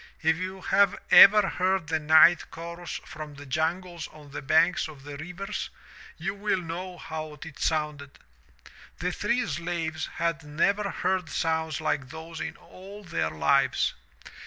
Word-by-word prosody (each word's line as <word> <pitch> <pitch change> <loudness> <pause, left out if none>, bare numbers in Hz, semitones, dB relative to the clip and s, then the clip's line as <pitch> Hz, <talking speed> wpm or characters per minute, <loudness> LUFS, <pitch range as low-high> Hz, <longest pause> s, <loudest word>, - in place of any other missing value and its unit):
If 160 0 +4
you 185 +1 -5
have 200 +1 +3
ever 210 +1 +10
heard 185 -1 0
the 160 0 -1
night 160 +3 +6
chorus 170 +1 -7
from 150 -2 -9
the 145 0 -11
jungles 165 +4 -2
on 150 -2 -15
the 145 - -6
banks 160 +6 +3
of 145 -4 -12
the 145 0 -8
rivers 180 +7 -5 0.5
you 195 - -3
will 205 -1 -1
know 180 +2 -6
how 155 -2 -7
it 160 -3 -11
sounded. 150 -3 -2 0.8
The - - -2
three - - 0
slaves 165 -2 -3
had 170 -1 -1
never 200 +7 0
heard 185 -4 -1
sounds 160 -1 -1
like 145 -4 -1
those 160 +2 -8
in - - -4
all 200 +3 -12
their 165 - -1
lives. 80 0 +2
165 Hz, 150 wpm, -27 LUFS, 155-185 Hz, 0.8 s, ever